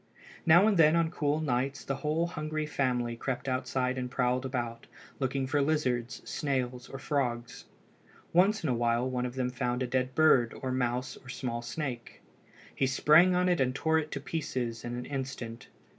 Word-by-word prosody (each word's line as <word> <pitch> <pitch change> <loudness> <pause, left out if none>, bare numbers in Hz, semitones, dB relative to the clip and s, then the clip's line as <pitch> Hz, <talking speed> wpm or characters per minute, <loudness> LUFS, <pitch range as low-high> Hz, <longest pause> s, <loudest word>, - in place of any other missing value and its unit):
Now 175 +4 +7
and 215 -3 +3
then 160 0 +6
on 165 -1 +2
cool 150 -2 0
nights 135 0 -1
the 135 - -2
whole 155 +3 0
hungry 155 -2 -3
family 125 -5 -1
crept 130 +2 -4
outside 130 0 -1
and 125 0 -3
prowled 125 +1 0
about, 120 -3 -4 0.3
looking 135 0 -1
for 145 +2 +1
lizards, 130 -5 0
snails, 130 -3 -2
or 135 - -6
frogs. 125 -3 -2 0.7
Once 195 +4 +4
in 155 - 0
a - - +2
while 120 +1 +1
one 125 -1 -1
of 125 - -8
them 125 -1 -1
found 125 0 -1
a - - 0
dead 130 +1 -1
bird 135 -7 +4
or 130 - -3
mouse 125 0 -1
or 125 - -15
small 120 -1 -3
snake. 120 0 -5 0.5
He 135 - +1
sprang 155 +7 +5
on 180 0 +2
it 175 -5 +2
and 130 0 +1
tore 160 +2 +2
it 155 -1 -4
to 140 - -3
pieces 130 -7 -3
in 120 0 -4
an 125 - -5
instant. 125 -4 -5
130 Hz, 185 wpm, -30 LUFS, 125-150 Hz, 0.7 s, Now